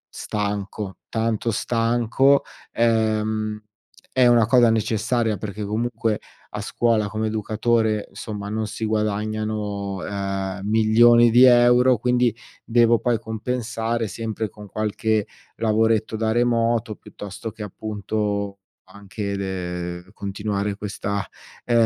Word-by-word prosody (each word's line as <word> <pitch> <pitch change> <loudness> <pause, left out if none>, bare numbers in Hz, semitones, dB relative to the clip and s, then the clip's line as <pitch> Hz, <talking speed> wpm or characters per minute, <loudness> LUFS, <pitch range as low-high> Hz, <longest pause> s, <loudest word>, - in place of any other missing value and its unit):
stanco, 100 -1 -4
tanto 115 0 -1
stanco, 120 +4 +2 0.3
ehm, 110 -2 +1 0.5
è 130 -1 +5
una 120 -2 +5
cosa 120 +1 +5
necessaria 110 0 0
perché 105 +1 -5
comunque 110 +1 -1 0.4
a - - -3
scuola 115 -3 +1
come 110 +1 -2
educatore, 110 0 0
insomma, 105 -2 -6
non 110 0 -2
si 110 - -4
guadagnano, 105 -1 -2
uhm, 95 0 -3
milioni 115 +2 +5
di 125 +3 +7
€, 125 0 +6
quindi 125 0 +1 0.3
devo 115 -1 +4
poi 120 -2 +1
compensare 115 0 -3
sempre 110 +2 -4
con 105 +2 -12
qualche 110 0 0 0.3
lavoretto 110 0 +1
da 110 0 0
remoto, 115 -1 +1
piuttosto 105 +1 -8
che 110 0 -8
appunto 105 -1 -3 0.3
anche 100 +1 -6
de 90 -2 -4
ehm, 90 +1 -18
continuare 100 0 -3
questa, 100 -1 -3 0.4
ehm, 115 -1 +4
110 Hz, 115 wpm, -23 LUFS, 105-115 Hz, 0.5 s, di